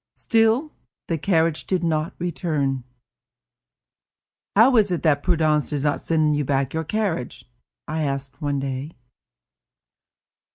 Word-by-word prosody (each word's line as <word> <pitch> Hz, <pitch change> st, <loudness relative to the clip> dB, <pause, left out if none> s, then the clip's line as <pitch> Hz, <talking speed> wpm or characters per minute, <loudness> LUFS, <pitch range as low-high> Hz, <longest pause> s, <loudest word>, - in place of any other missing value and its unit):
Still, 225 Hz, +6 st, +2 dB, 0.4 s
the 165 Hz, -2 st, -1 dB
carriage 165 Hz, -2 st, +1 dB
did 185 Hz, -2 st, 0 dB
not 160 Hz, -1 st, -1 dB
return. 150 Hz, -7 st, -1 dB, 1.7 s
"How 240 Hz, +5 st, +6 dB
is 210 Hz, -2 st, +4 dB
it 175 Hz, -, -1 dB
that 145 Hz, -3 st, +3 dB
Prudence 155 Hz, -4 st, +1 dB
does 145 Hz, -2 st, -2 dB
not 145 Hz, -1 st, 0 dB
send 155 Hz, -2 st, +2 dB
you 145 Hz, -, 0 dB
back 135 Hz, -1 st, 0 dB
your 160 Hz, 0 st, -1 dB
carriage?" 175 Hz, -, -3 dB, 0.4 s
I 155 Hz, +1 st, -2 dB
asked 135 Hz, -2 st, -3 dB
one 145 Hz, -1 st, -1 dB
day. 135 Hz, +3 st, -4 dB
155 Hz, 125 wpm, -23 LUFS, 140-175 Hz, 1.7 s, How